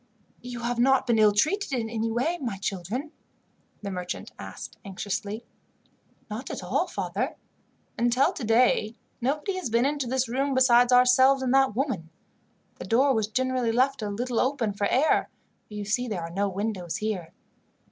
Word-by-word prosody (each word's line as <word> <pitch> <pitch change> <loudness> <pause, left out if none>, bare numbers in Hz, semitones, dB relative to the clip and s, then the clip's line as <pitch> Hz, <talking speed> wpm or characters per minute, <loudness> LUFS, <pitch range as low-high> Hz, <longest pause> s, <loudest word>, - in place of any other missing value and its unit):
"You 245 -1 -7
have 240 0 -2
not 265 +2 +4
been 235 -3 +2
ill 215 -1 +6
treated 310 - +1
in 235 -3 -1
any 225 0 -2
way, 260 +10 0
my 230 -7 -3
children?" 200 - -4 0.7
the 200 - -4
merchant 180 -1 -5
asked - - -9
anxiously. 205 +2 -4 0.8
"Not 220 +5 -6
at - - -5
all, - - 0
father. - - -3 0.6
Until 240 +3 +3
today, 230 -2 +2 0.3
nobody 295 - -1
has 365 -10 -3
been 235 +3 +2
into 285 -2 -1
this 260 +1 0
room 270 +3 -1
besides 245 -1 +5
ourselves 260 +2 +5
and 255 0 +1
that 270 -5 +3
woman. 235 - -2 0.7
The - - -6
door 265 +4 +3
was 220 -3 0
generally 255 +1 0
left 260 +2 +1
a 210 - -2
little 235 +3 -2
open 255 -6 0
for 200 0 0
air, 275 +9 +2 0.4
for - - -14
you 205 -1 -4
see 245 +4 0
there 195 -7 -3
are 165 - -6
no 200 +3 0
windows 195 -3 -3
here. 210 -7 -3
240 Hz, 165 wpm, -26 LUFS, 210-260 Hz, 0.8 s, ill